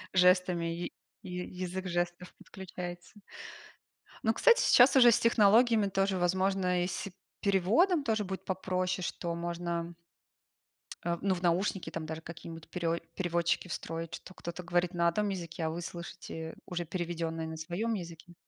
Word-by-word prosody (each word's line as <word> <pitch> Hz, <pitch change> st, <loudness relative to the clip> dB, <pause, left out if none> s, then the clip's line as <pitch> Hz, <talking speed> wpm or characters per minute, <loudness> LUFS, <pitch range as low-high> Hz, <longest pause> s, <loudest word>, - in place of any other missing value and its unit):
Жестами, 180 Hz, -1 st, +4 dB
я 165 Hz, +1 st, -2 dB, 0.4 s
я 180 Hz, -1 st, -4 dB
язык 185 Hz, +1 st, -5 dB
жестов 175 Hz, 0 st, -2 dB
подключается. 180 Hz, -2 st, -8 dB, 1.1 s
Ну, 220 Hz, -, +3 dB
кстати, 485 Hz, -, +5 dB
сейчас 250 Hz, +3 st, +6 dB
уже 240 Hz, -3 st, +8 dB
с -, -, +4 dB
технологиями, 225 Hz, -1 st, +5 dB
тоже 195 Hz, 0 st, +1 dB
возможно, 185 Hz, 0 st, +1 dB
и -, -, -2 dB
с 190 Hz, -, -4 dB, 0.3 s
переводом 225 Hz, -, +3 dB
тоже 220 Hz, -2 st, +1 dB
будет 190 Hz, -1 st, -5 dB
попроще, 185 Hz, 0 st, -1 dB
что 170 Hz, 0 st, -3 dB
можно 170 Hz, 0 st, -3 dB, 1.1 s
Э 170 Hz, 0 st, +1 dB
в -, -, -14 dB
ну 195 Hz, -2 st, +2 dB
в 175 Hz, -, -7 dB
наушники 180 Hz, +2 st, +1 dB
там 165 Hz, -1 st, -5 dB
даже 160 Hz, +1 st, -5 dB
какие-нибудь 165 Hz, -1 st, -9 dB
перео 170 Hz, -1 st, -1 dB, 0.2 s
переводчики 175 Hz, -1 st, 0 dB
встроить. 165 Hz, -1 st, -4 dB
Что 185 Hz, -, -12 dB
кто-то 175 Hz, 0 st, -7 dB
говорит 175 Hz, +1 st, +1 dB
на 170 Hz, -1 st, +2 dB
одном 205 Hz, +5 st, +1 dB
языке, 170 Hz, -3 st, -4 dB
а -, -, +1 dB
вы 165 Hz, +2 st, -4 dB
слышите 170 Hz, -2 st, -7 dB
уже 175 Hz, -1 st, -3 dB
переведенное 165 Hz, -1 st, -3 dB
на 160 Hz, 0 st, -6 dB
своем 175 Hz, +8 st, -2 dB
языке. 170 Hz, -3 st, -7 dB
180 Hz, 155 wpm, -31 LUFS, 170-190 Hz, 1.1 s, уже